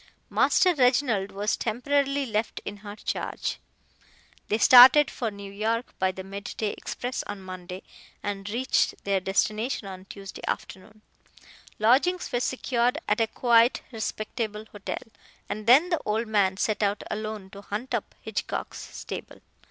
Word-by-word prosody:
Master 365 -1 +4
Reginald 250 - +2
was 205 +2 0
temporarily 275 +4 0
left 220 -2 -2
in 205 - -5
her 205 0 -9
charge. - - -3 0.9
They 215 - +1
started 255 +5 +9
for 235 - -2
New 200 -1 -9
York 225 +4 -2
by 190 0 +2
the 190 0 -8
mid 195 +1 -7
day 215 -2 0
express 250 +1 -4
on 205 -2 -6
Monday, 185 0 -8 0.4
and 205 0 -4
reached 245 +5 +1
their 200 -1 +1
destination 215 +4 -1
on 185 -1 -9
Tuesday 195 0 -9
afternoon. 215 +3 -5 0.7
Lodgings 275 +12 +3
were 245 - +1
secured 245 -1 0
at 210 +2 +2
a 225 - +3
quiet, 235 +1 +3
respectable 215 -1 -4
hotel, 205 -2 -5 0.4
and 215 +1 -5
then 280 +9 +7
the 340 -3 0
old 220 +2 0
man 200 -3 +2
set 215 +1 0
out 205 0 0
alone 215 -2 -5
to 200 - -10
hunt 210 +5 -5
up - - -3
Hitchcock's - - -4
stable. - - -8
215 Hz, 145 wpm, -26 LUFS, 200-245 Hz, 0.9 s, started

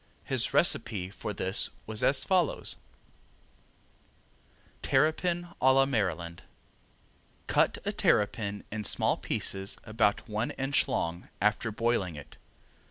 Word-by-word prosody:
His - - +1
recipe 95 -3 +2
for 105 - -5
this 95 0 -1 0.2
was 110 -1 -1
as 135 - +3
follows: 185 -5 +1 2.0
Terrapin 175 +3 +1
a 130 0 +6
La 135 0 +5
Maryland 90 - -2 1.0
Cut - - +2
a - - 0
terrapin 105 -1 +1
in 110 0 -3
small - - +1
pieces, 95 +1 -2
about 110 0 +1
one 110 +1 -2
inch 135 +1 +1
long, 85 +1 -2
after 105 +3 +1
boiling 110 -6 0
it. 75 - -11
105 Hz, 110 wpm, -29 LUFS, 95-130 Hz, 2.0 s, a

